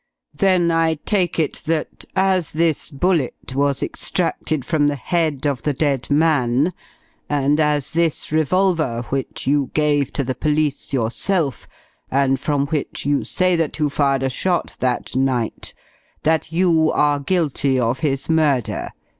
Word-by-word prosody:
"Then 185 -4 +2
I 165 -1 +2
take 180 +3 -1
it 155 -4 -1
that, 160 -1 -2
as 190 -3 +1
this 160 -1 0
bullet 150 -4 -1
was 140 0 0
extracted 150 -5 -2
from 150 -2 +2
the 145 - 0
head 155 -1 -1
of 140 -3 0
the 150 - 0
dead 140 -2 -1
man, 145 0 +2 0.6
and 145 +1 +1
as 150 -3 +1
this 165 -2 -1
revolver 155 -6 +1
which 135 -1 -3
you 140 -1 +1
gave 145 -3 +2
to 140 - 0
the 130 0 -2
police 150 0 -1
yourself, 135 - -1 0.4
and 135 -1 +2
from 140 -1 0
which 150 -3 -2
you 145 0 +1
say 185 -1 +1
that 165 -3 -1
you 150 -2 0
fired 140 -2 +1
a 135 - +1
shot 180 +5 -1
that 125 -1 -1
night, 130 -3 -1 0.5
that 160 0 +1
you 165 -2 +3
are 145 -1 +2
guilty 140 -4 0
of 120 +1 0
his 135 -2 -1
murder. 150 -7 +1
150 Hz, 145 wpm, -20 LUFS, 135-165 Hz, 0.6 s, you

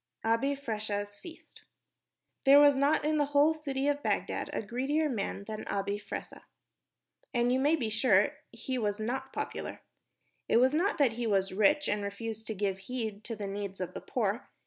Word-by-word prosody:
Abi 230 +6 +2
Fressah's 210 -5 -4
Feast 335 -2 -13 0.8
There 280 +1 +8
was 290 0 +7
not 280 +3 +2
in 305 0 +2
the 290 - +3
whole 300 +3 +6
city 280 -3 -2
of 290 0 +1
Bagdad - - -1
a - - -3
greedier 270 +8 0
man 205 -6 -3
than 215 +1 -6
Abi 200 +1 -1
Fressah, - - -7 0.9
and 240 0 +3
you 255 - +2
may 290 +4 +4
be 235 -8 -2
sure 215 -3 +4 0.2
he 255 +2 -4
was 205 -1 -1
not 265 +4 -3
popular. - - -5 0.7
It - - +5
was 260 +3 +4
not 350 +4 +1
that 275 -7 +3
he 235 0 -2
was 195 -2 +1
rich 295 +10 +3
and 205 0 0
refused 220 +2 -5
to 220 - -2
give 195 -1 -1
heed 220 -5 -4
to 230 - -4
the 205 -1 -5
needs 200 -1 -5
of 185 - -4
the - - -6
poor. 225 -1 -2
230 Hz, 185 wpm, -30 LUFS, 205-280 Hz, 0.9 s, There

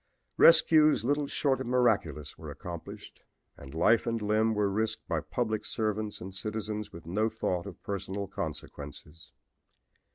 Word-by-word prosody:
"Rescues 155 -5 +6
little 145 +2 +1
short 135 -2 0
of 130 - -4
miraculous 105 - +1
were - - -9
accomplished 85 -2 -9 0.3
and 70 +1 -11
life 110 +9 +3
and 115 0 0
limb 110 +1 +2
were 105 -1 +2
risked 110 +3 -2
by - - 0
public 110 -4 -2
servants 110 -1 -1
and 95 +1 -8
citizens 105 +1 -4
with 85 -1 -11
no 105 +7 0
thought 100 -4 -2
of 95 - -11
personal 100 0 -3
consequences. 80 -4 -8
105 Hz, 140 wpm, -30 LUFS, 90-115 Hz, 0.3 s, Rescues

